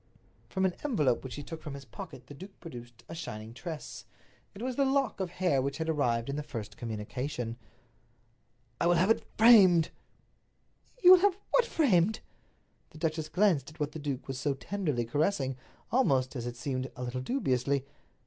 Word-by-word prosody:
From 190 Hz, -1 st, 0 dB
an 185 Hz, -, +1 dB
envelope 150 Hz, -, +1 dB
which 130 Hz, -, -6 dB
he 145 Hz, -, -6 dB
took 160 Hz, +2 st, -8 dB
from 145 Hz, -2 st, -6 dB
his 140 Hz, -1 st, -9 dB
pocket 135 Hz, -, -10 dB
the 145 Hz, -, -11 dB
duke 190 Hz, +7 st, -12 dB
produced 120 Hz, -7 st, -10 dB
a -, -, -8 dB
shining 110 Hz, -9 st, -7 dB
tress. 150 Hz, +6 st, -7 dB, 0.5 s
It 205 Hz, -, -7 dB
was 255 Hz, 0 st, -2 dB
the 275 Hz, -, +3 dB
lock 270 Hz, -5 st, +1 dB
of 190 Hz, -2 st, -2 dB
hair 175 Hz, -6 st, +1 dB
which 135 Hz, +1 st, -2 dB
had 160 Hz, 0 st, -3 dB
arrived 120 Hz, -7 st, +1 dB
in 140 Hz, +1 st, -3 dB
the -, -, -1 dB
first 120 Hz, -8 st, -7 dB
communication. 115 Hz, +2 st, -4 dB, 1.2 s
"I 170 Hz, -, +2 dB
will 175 Hz, -, +5 dB
have 185 Hz, +6 st, +4 dB
it -, -, +2 dB
framed." 195 Hz, -8 st, +7 dB, 1.1 s
"You 360 Hz, -, +10 dB
will 370 Hz, -, +10 dB
have 390 Hz, 0 st, +3 dB
what -, -, +4 dB
framed?" 215 Hz, -, +3 dB, 0.7 s
The -, -, -14 dB
duchess 155 Hz, -1 st, -2 dB
glanced 180 Hz, -9 st, +2 dB
at 155 Hz, +2 st, -17 dB
what 150 Hz, 0 st, -1 dB
the 160 Hz, -, -7 dB
duke 140 Hz, -3 st, -4 dB
was 135 Hz, -2 st, -4 dB
so 140 Hz, +2 st, 0 dB
tenderly 150 Hz, -6 st, -2 dB
caressing, 140 Hz, -, 0 dB, 0.4 s
almost, 135 Hz, -, +2 dB
as 120 Hz, -1 st, -3 dB
it 120 Hz, -, -5 dB
seemed, 130 Hz, -1 st, -3 dB
a 125 Hz, -, -6 dB
little 125 Hz, +1 st, -3 dB
dubiously. 135 Hz, -, 0 dB
150 Hz, 185 wpm, -30 LUFS, 130-190 Hz, 1.2 s, You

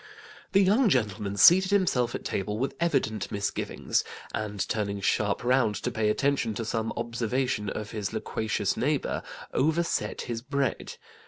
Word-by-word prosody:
The 195 Hz, 0 st, +6 dB
young 210 Hz, +5 st, +4 dB
gentleman 105 Hz, -, 0 dB
seated 185 Hz, -, +7 dB
himself 180 Hz, -12 st, +2 dB
at -, -, -6 dB
table 105 Hz, +2 st, -2 dB
with 135 Hz, +4 st, -1 dB
evident 130 Hz, -, 0 dB
misgivings, 100 Hz, -1 st, -1 dB, 0.3 s
and 105 Hz, -2 st, -2 dB
turning 100 Hz, -2 st, -2 dB
sharp 100 Hz, +2 st, 0 dB
round 125 Hz, -4 st, +2 dB
to 125 Hz, -, -3 dB
pay 110 Hz, -2 st, +1 dB
attention 130 Hz, -2 st, +1 dB
to 115 Hz, 0 st, -3 dB
some 110 Hz, 0 st, -1 dB
observation 120 Hz, -1 st, -1 dB
of 105 Hz, -1 st, -5 dB
his 105 Hz, -3 st, -3 dB
loquacious 110 Hz, -2 st, -1 dB
neighbour, 145 Hz, +2 st, 0 dB, 0.3 s
overset 160 Hz, +4 st, 0 dB
his 115 Hz, -2 st, -4 dB
bread. 140 Hz, 0 st, -2 dB
115 Hz, 145 wpm, -27 LUFS, 105-140 Hz, 0.3 s, seated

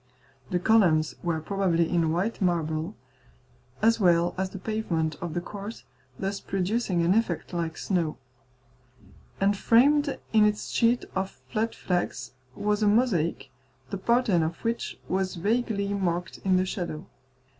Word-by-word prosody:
The 180 Hz, -, +1 dB
columns 175 Hz, -6 st, +3 dB
were 170 Hz, -2 st, -1 dB
probably 170 Hz, -1 st, +1 dB
in 165 Hz, -2 st, +1 dB
white 195 Hz, +7 st, -1 dB
marble, 165 Hz, 0 st, 0 dB, 0.9 s
as 230 Hz, +1 st, +4 dB
well 175 Hz, -3 st, +3 dB
as 190 Hz, 0 st, -2 dB
the 195 Hz, -, -8 dB
pavement 180 Hz, -7 st, -1 dB
of 170 Hz, -3 st, -4 dB
the 175 Hz, -, 0 dB
court, 205 Hz, +4 st, -8 dB, 0.3 s
thus 195 Hz, +1 st, -2 dB
producing 195 Hz, -1 st, 0 dB
an 170 Hz, +2 st, +4 dB
effect 195 Hz, -6 st, -1 dB
like 165 Hz, -2 st, -2 dB
snow; 170 Hz, -5 st, -1 dB, 1.2 s
and 200 Hz, +1 st, +3 dB
framed 280 Hz, +7 st, +4 dB, 0.2 s
in 215 Hz, -1 st, +6 dB
its 210 Hz, 0 st, +1 dB
sheet 235 Hz, +1 st, +2 dB
of 190 Hz, 0 st, -3 dB
flat 225 Hz, 0 st, -1 dB
flags 175 Hz, -9 st, -2 dB, 0.2 s
was 210 Hz, +1 st, 0 dB
a 210 Hz, -, +3 dB
mosaic, 200 Hz, -, +1 dB, 0.4 s
the -, -, -2 dB
pattern 225 Hz, -4 st, +3 dB
of 160 Hz, +1 st, -1 dB
which 230 Hz, 0 st, -2 dB
was 190 Hz, 0 st, -1 dB
vaguely 205 Hz, +1 st, 0 dB
marked 175 Hz, -3 st, -2 dB
in 190 Hz, -1 st, +2 dB
the 185 Hz, -, +2 dB
shadow. 175 Hz, -5 st, -4 dB
190 Hz, 145 wpm, -27 LUFS, 170-215 Hz, 1.2 s, in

